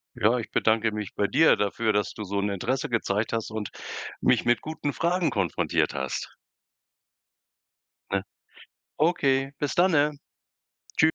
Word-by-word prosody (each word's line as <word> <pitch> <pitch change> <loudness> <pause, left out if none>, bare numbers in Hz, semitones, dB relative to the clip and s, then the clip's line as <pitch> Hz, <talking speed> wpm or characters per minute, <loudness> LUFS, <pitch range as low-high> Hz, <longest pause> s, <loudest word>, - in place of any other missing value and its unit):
Ja, 115 +4 +3
ich 115 - -6
bedanke 110 0 +2
mich 105 -1 -5
bei 100 - +1
dir, 160 +8 +5
dafür 110 +2 0
dass 105 0 0
du 105 - -6
so 100 +1 -2
'n 100 +1 0
Interesse 125 +7 -2
gezeigt 110 -2 0
hast 115 -1 -2
und 110 -2 -4 0.5
mich - - +3
mit 120 0 +3
guten 155 -2 -3
Fragen 175 +2 +1
konfrontiert 95 -5 0
hast. - - -4 1.8
Ne - - +1 0.8
Okay. 135 -4 +2
Bis 145 - -1
danne! 160 -5 +4 0.9
Tschü - - +4
115 Hz, 140 wpm, -26 LUFS, 105-145 Hz, 1.8 s, dir